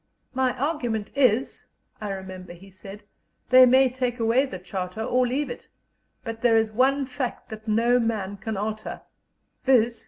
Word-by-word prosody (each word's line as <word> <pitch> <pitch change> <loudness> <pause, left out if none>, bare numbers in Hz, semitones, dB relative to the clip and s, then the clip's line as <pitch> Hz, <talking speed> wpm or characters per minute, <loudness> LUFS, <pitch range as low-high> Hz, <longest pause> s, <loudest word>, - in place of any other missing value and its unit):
"My 260 -1 0
argument 245 -7 -2
is," 255 -3 +1 0.3
I 210 - -4
remember 185 -2 -7
he 195 +3 -15
said, 195 +2 -11 0.5
"they 255 0 +9
may 260 +2 +5
take 250 -1 -3
away 230 +4 +3
the 190 - -6
Charter 185 +3 -5
or 250 +1 +2
leave 275 +4 -2
it, 485 - -9 0.6
but 225 -2 -6
there 230 -2 +4
is 220 -1 +1
one 270 +5 +2
fact 255 -1 -5
that 220 0 -9
no 235 +3 +3
man 210 -4 -2
can 220 +1 -4
alter 215 +1 -4 0.6
viz. 235 -3 +3
230 Hz, 160 wpm, -25 LUFS, 210-255 Hz, 0.6 s, they